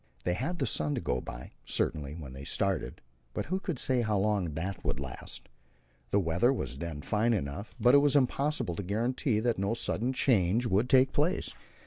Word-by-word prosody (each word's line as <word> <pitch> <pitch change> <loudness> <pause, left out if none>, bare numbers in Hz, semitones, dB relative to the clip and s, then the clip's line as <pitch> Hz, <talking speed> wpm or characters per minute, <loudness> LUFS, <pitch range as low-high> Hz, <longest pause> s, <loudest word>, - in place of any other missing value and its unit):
They 90 - +1
had 175 - -2
the 135 - 0
sun 75 - 0
to - - -1
go 60 0 -1
by, - - -8
certainly, 75 +2 -1
when 75 -6 -8
they 65 +1 -8
started, 100 +5 -1 0.3
but - - -2
who 185 +4 -1
could 175 -6 -3
say 125 0 +2
how 110 -3 +1
long 95 -6 0
it 95 +3 -4
would - - -1
last? 65 -2 -7 0.6
The 100 - +3
weather 90 +7 +2
was 135 - -3
then 80 -4 -5
fine 110 +3 +2
enough, 95 +5 -4
but 125 +1 +5
it 140 - +9
was 145 0 +3
impossible 140 - +1
to - - -1
guarantee 110 +4 0
that 120 -3 0
no 100 +4 0
sudden 120 +1 -1
change 115 -4 +2
would 110 +2 +2
take 130 0 +5
place. 170 +7 0
105 Hz, 195 wpm, -30 LUFS, 85-130 Hz, 0.6 s, it